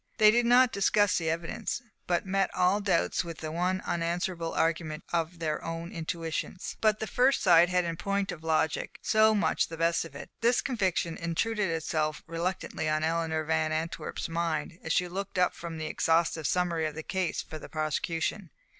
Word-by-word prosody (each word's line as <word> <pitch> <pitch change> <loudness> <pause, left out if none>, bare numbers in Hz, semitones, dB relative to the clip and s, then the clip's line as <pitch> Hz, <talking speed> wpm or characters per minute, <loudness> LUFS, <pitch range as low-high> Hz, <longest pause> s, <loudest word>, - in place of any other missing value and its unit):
They 215 0 +7
did 235 +1 +2
not 250 0 +6
discuss 200 0 +3
the 165 -1 -1
evidence, 165 +6 -2 0.3
but 175 +1 +1
met 195 0 +1
all 185 +3 +3
doubts 190 -4 +1
with 165 -2 -7
the 155 -1 -5
one 180 +3 0
unanswerable 170 0 -2
argument 160 -2 0
of 170 0 0
their 155 -2 -2
own 165 +1 -5
intuitions. 165 +2 -4
But 215 -1 +3
the - - -2
first 255 +4 +3
side 175 -2 +6
had 180 -1 +2
in 165 -1 -3
point 200 +2 -1
of 160 - -8
logic, 160 -1 0
so 220 0 +4
much 205 - +1
the 165 - -8
best 165 +1 +2
of 165 - -11
it! - - -9
This 235 +2 +4
conviction 190 -9 0
intruded 195 +5 -1
itself 155 -1 -1
reluctantly 165 -1 -2
on 155 0 +1
Eleanor 160 -1 0
Van 160 0 0
Antwerp's 160 +1 -3
mind, 165 0 -2
as 160 - -3
she 180 +2 +2
looked 195 +2 -5
up 180 0 +3
from 170 -1 -7
an 160 - -6
exhaustive 160 0 +1
summary 170 -3 +1
of 150 - -6
the 160 - -5
case 190 -2 -2
for 155 - -8
the - - -10
prosecution. 165 +4 -2
170 Hz, 185 wpm, -29 LUFS, 160-190 Hz, 0.3 s, They